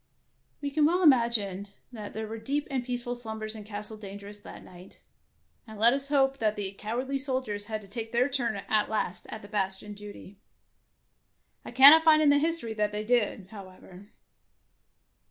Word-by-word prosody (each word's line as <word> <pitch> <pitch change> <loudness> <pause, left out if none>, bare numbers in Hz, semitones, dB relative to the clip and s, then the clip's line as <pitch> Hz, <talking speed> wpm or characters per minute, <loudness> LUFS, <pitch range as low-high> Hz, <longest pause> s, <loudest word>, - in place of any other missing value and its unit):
We 285 -1 -3
can 295 +1 +3
well 360 +3 +1
imagine 230 - +2 0.2
that 215 -4 -9
there 220 0 -4
were 220 +1 -7
deep 285 +6 -3
and 260 -2 -2
peaceful 245 0 -4
slumbers 220 -2 -3
in 215 - -9
Castle 210 +1 -8
Dangerous 200 0 -8
that - - -12
night, 180 +1 -15 0.7
and 220 -1 -11
let 235 +3 +5
us 275 0 +3
hope 275 -1 +1
that 215 -1 0
the 200 -2 -4
cowardly 245 +7 -4
soldiers 255 -7 0
had 215 -1 -5
to - - -14
take 225 +2 -6
their 240 +2 +2
turn 250 -5 -1
at 215 -1 +1
last 185 -4 -3
at 210 -1 -9
bastion 195 0 +1
duty. 205 -1 -12 1.2
I - - -9
cannot 280 +6 +8
find 315 -1 +5
in 305 -2 +4
the 285 - +4
history 315 -7 -1
that 210 -1 -1
they 210 0 -4
did, 210 -4 -1
however. 190 -1 -13
220 Hz, 175 wpm, -27 LUFS, 205-265 Hz, 1.2 s, cannot